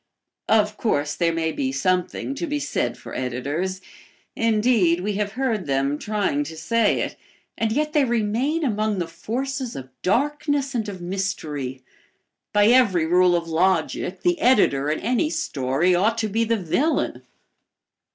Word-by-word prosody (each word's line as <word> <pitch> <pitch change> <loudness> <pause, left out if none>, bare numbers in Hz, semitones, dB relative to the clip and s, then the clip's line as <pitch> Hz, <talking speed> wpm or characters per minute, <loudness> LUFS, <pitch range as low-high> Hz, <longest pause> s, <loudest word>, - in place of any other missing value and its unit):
Of 210 -1 +3
course, 145 -9 0
there 170 +1 +1
may 165 -1 -1
be 265 - -2
something 185 +3 -1
to 335 +5 -4
be 295 -1 -1
said - - -2
for - - -10
editors. 145 +10 -3 0.5
Indeed, 215 -6 +2
we 205 +2 -1
have 205 -1 -2
heard 225 - -1
them 140 +1 0
trying 205 -9 0
to 160 +2 -8
say 220 +7 +1
it, - - -3 0.4
and 225 -1 -1
yet 300 +5 0
they 295 - +4
remain 240 +7 0
among 215 -5 0
the 175 -2 -2
forces 255 +8 -4
of 130 -1 -7
darkness 285 +5 0
and 220 -4 -2
of 190 -3 -8
mystery. 155 -9 -3 0.7
By 205 +1 +4
every 215 -10 +4
rule 180 +1 +4
of 170 -1 -1
logic 180 +4 0
the 350 -2 +2
editor 150 - +3
in 155 - 0
any 250 +8 +1
story 140 - 0
ought 210 +6 +2
to 225 -1 0
be 225 +3 0
the 230 0 +1
villain. 205 - 0
205 Hz, 155 wpm, -23 LUFS, 165-240 Hz, 0.7 s, they